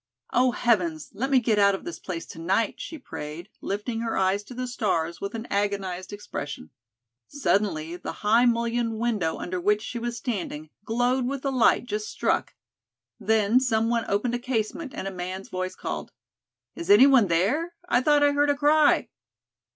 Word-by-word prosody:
"Oh, 255 +1 +4
heavens, 180 -11 0
let 265 +4 -2
me 275 - +4
get 220 -3 +1
out 200 -1 +5
of - - -8
this 345 - -6
place 170 -3 -5
to - - -11
night," 190 +6 0
she 325 - -6
prayed, 170 - -8
lifting 210 +4 -3
her 230 -1 -2
eyes 190 +1 +2
to 250 - -10
the 255 +1 -3
stars 185 -9 -1
with 200 +3 -4
an 225 0 -5
agonized 195 -2 -2
expression. 145 - -6 0.6
Suddenly, 190 - 0
the - - -5
high 230 +4 +5
mullioned 235 -1 0
window 215 -8 0
under 180 0 -4
which 210 +3 +2
she 240 - -5
was 235 0 -3
standing, 175 - -4
glowed 245 +2 +1
with 275 +1 -4
a 275 - +1
light 245 -1 +3
just 215 -2 -3
struck. - - -1 0.6
Then, 220 +2 +3
someone 230 -2 +1
opened 210 +5 0
a 245 - -1
casement 255 +4 -2
and 195 - -4
a - - -3
man's 185 +1 -6
voice 185 0 -3
called: - - -5 0.6
"Is 340 +2 -7
anyone 270 - +7
there? 245 - +1
I 250 - +3
thought 295 +1 +4
I 290 - +5
heard 290 0 +2
a 285 - +3
cry." 300 +1 +4
225 Hz, 175 wpm, -26 LUFS, 190-250 Hz, 0.6 s, anyone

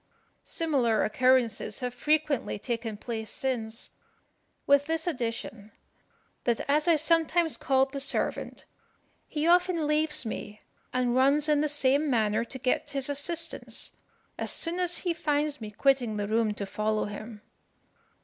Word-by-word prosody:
"Similar 265 -9 +1
occurrences 250 -1 +2
have 250 -1 -3
frequently 300 -3 0
taken 230 -1 -4
place 220 -1 -5
since, 230 -4 -3 0.7
with 280 +1 +4
this 320 0 -1
addition, 230 - -4 0.7
that 235 -2 +1
as 295 +3 +2
I 335 - +6
sometimes 325 +1 +2
called 270 0 +1
the 280 - -3
servant, 275 - -2 0.6
he 300 0 -2
often 350 -1 +3
leaves 300 -1 +1
me 210 -1 -6 0.3
and 250 -1 0
runs 280 +3 +3
in 300 -1 +3
the 305 - +1
same 285 +1 +3
manner 220 -2 +1
to 250 +3 -6
get 255 0 0
his 275 0 -1
assistance, 330 +4 -2 0.4
as - - -2
soon 345 +1 -1
as 355 -1 +1
he 350 -2 -1
finds 295 -3 -1
me 215 - -5
quitting 245 -1 +1
the 205 0 -2
room 220 -1 +1
to 200 - -4
follow 215 +2 -1
him. 210 +1 -8
270 Hz, 140 wpm, -28 LUFS, 225-305 Hz, 0.7 s, I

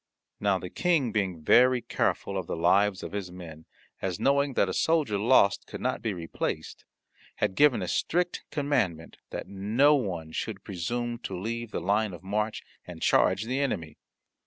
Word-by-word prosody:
Now 100 -2 +2
the 90 0 -7
King 160 -9 +1
being 95 -6 -2
very 125 +8 +5
careful 100 -3 -1
of 95 -3 -3
the - - -3
lives 95 +4 +2
of - - -6
his 100 -3 -4
men, 80 -3 -10 0.4
as 90 -3 -2
knowing 140 -1 +2
that - - +3
a 95 - -2
soldier 150 -11 +1
lost 105 -3 +4
could - - -7
not 130 +1 -1
be 115 - -1
replaced, 85 -4 -4 0.5
had - - 0
given 145 +2 +4
a - - -3
strict 180 +1 0
commandment 100 - -1
that - - -5
no 110 +9 +3
one 90 - -2
should 100 +3 -4
presume 120 +6 -3
to 95 -6 -5
leave 115 +3 -4
the - - -3
line 100 +3 +1
of 90 +1 -10
march 105 +3 -2 0.2
and 90 -2 -9
charge 100 - +3
the 130 +4 -2
enemy. 85 - -2
105 Hz, 175 wpm, -28 LUFS, 90-125 Hz, 0.5 s, very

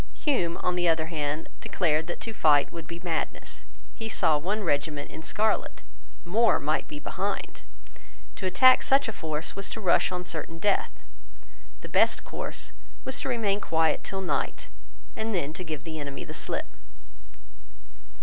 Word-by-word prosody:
Hume, 180 - +1
on 180 - +2
the 175 -1 +2
other 160 -1 +2
hand, 150 0 -2
declared 160 -2 +1
that 175 - -4
to 225 - -4
fight 150 -7 +4
would 165 -2 -7
be 170 - -6
madness. 165 -3 -3 0.3
He 225 0 -5
saw 160 -7 +3
one 205 +7 -1
regiment 145 -2 -1
in 160 - -7
scarlet. 215 +6 0 0.4
More 220 +7 +4
might 150 +2 0
be 150 - -6
behind. 200 +6 -3 0.8
To 190 - -1
attack 255 +8 +7
such 270 -1 +4
a 225 - -3
force 155 -3 -3
was 195 0 -2
to - - -4
rush 185 -3 +3
on 180 0 -3
certain 165 -1 -3
death 200 +3 0 0.8
The - - -7
best - - +4
course - - -4 0.3
was 265 +1 -2
to - - -2
remain 215 -5 +1
quiet 160 0 +2
till 195 0 -3
night, 185 - -2 0.5
and 220 -1 -1
then 155 -4 -1
to 185 - -5
give 155 -3 -5
the 160 -1 -5
enemy 140 -1 -5
the - - -8
slip. - - -1
170 Hz, 165 wpm, -28 LUFS, 155-205 Hz, 0.8 s, attack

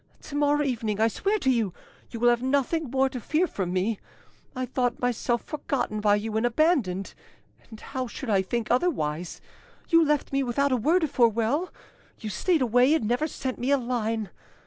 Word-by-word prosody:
To 290 - -8
morrow 290 0 +2
evening, 225 -6 -2
I 220 - +4
swear 400 - 0
to 265 -10 +1
you, 220 -7 0 0.3
you 230 - -7
will 240 +1 +5
have 240 0 0
nothing 280 +3 0
more 265 +1 +2
to 260 -2 -6
fear 310 - +1
from 190 - -3
me. 190 +4 0 0.6
I 255 0 -2
thought 250 -1 -1
myself 240 -1 0
forgotten 265 -8 -3
by 205 -1 +4
you 215 +1 -3
and 220 - 0
abandoned; 240 - +1 0.6
and 220 -2 -11
how 260 0 -4
should 255 +3 -7
I 200 -3 +3
think 225 +4 -3
otherwise? 180 - -1 0.5
You 330 -1 +6
left 295 -2 0
me 275 - +2
without 270 +2 0
a - - +3
word 320 +9 +2
of 305 - -1
farewell, 235 - +2 0.5
you 215 - -5
stayed 320 - +1
away 250 +5 +4
and 225 -9 -1
never 245 +7 +1
sent 260 -3 -5
me 250 - -1
a 280 - +4
line! 225 -5 -2
245 Hz, 190 wpm, -26 LUFS, 220-285 Hz, 0.6 s, You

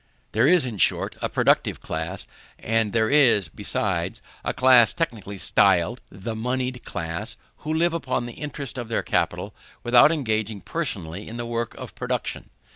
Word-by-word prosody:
There 115 +5 +3
is, 175 -3 +5
in 115 -5 -5
short, - - +2
a - - -1
productive - - +2
class, 80 +4 -5 0.3
and 115 -1 0
there 110 0 +2
is, 120 - +4
besides, - - -2 0.2
a - - 0
class 125 -3 +5
technically 110 - -3
styled 100 +3 +3
the 100 +4 -6
monied 125 +2 -2
class, 85 0 -4 0.2
who 155 - -5
live 165 +2 +2
upon 130 -7 -2
the 120 - -7
interest 140 -2 -6
of 120 - -5
their 115 - -1
capital, - - -1 0.3
without 120 +5 +6
engaging 110 -8 -1
personally 100 - -4
in 115 - -7
the 120 - -4
work 115 0 -3
of - - -9
production. - - -3
115 Hz, 160 wpm, -24 LUFS, 100-130 Hz, 0.3 s, without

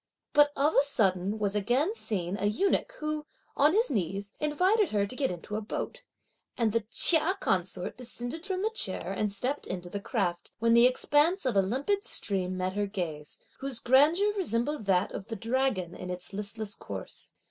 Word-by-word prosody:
But 290 0 +5
of 290 +3 +2
a - - +5
sudden 200 -7 +1
was 205 -1 -1
again 245 - +1
seen 190 - -2
a 205 0 -1
eunuch 390 - 0
who, 305 0 -3 0.3
on 295 +3 +4
his 455 +5 +2
knees, 200 -1 -3
invited 365 +8 +2
her 205 -1 +1
to 225 - -7
get 270 0 0
into 180 +4 -6
a - - -3
boat; 215 - -5 0.6
and 230 -4 +1
the 230 0 -1
Chia 335 +7 +7
consort 185 0 -1
descended 245 +5 -6
from 380 0 -2
the 440 - 0
chair 190 - -2
and 210 +1 -1
stepped 255 +8 -3
into 180 -1 -6
the 205 - -3
craft, 195 -6 -2
when 230 +1 +2
the 235 +1 +7
expanse 295 +7 +2
of 250 -5 0
a 195 - +5
limpid 275 - -1
stream 185 - 0
met 185 0 -2
her 205 0 -1
gaze, 160 -7 -5 0.2
whose 270 -2 -4
grandeur 300 - +4
resembled 295 - -1
that 190 -1 +1
of 195 - -7
the 225 - -5
dragon 225 -5 -1
in 180 - -8
its 180 +2 -7
listless 210 +1 -4
course. - - -8
230 Hz, 185 wpm, -28 LUFS, 195-295 Hz, 0.6 s, Chia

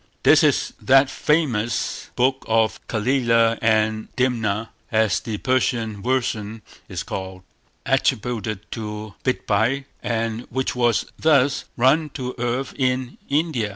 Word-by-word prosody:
This - - +6
is - - +2
that 135 +1 +5
famous 125 -8 0
book 130 +2 +1
of 110 0 +2
Calila 115 -1 +2
and 110 -1 +1
Dimna, 115 -4 0 0.2
as 110 -3 +2
the 110 -2 -4
Persian 115 -4 0
version 110 -3 -2 0.3
is - - -4
called, 95 -1 -6 0.4
attributed 110 -3 0
to 105 -1 -6
Bidpai, 130 +2 0 0.2
and 115 0 -2
which 130 0 -2
was 120 -3 +2
thus 145 -3 +3
run 150 +6 +3
to 125 -2 -4
earth 125 +2 -2
in 130 -1 -1
India. 145 -7 0
120 Hz, 120 wpm, -22 LUFS, 110-130 Hz, 0.4 s, This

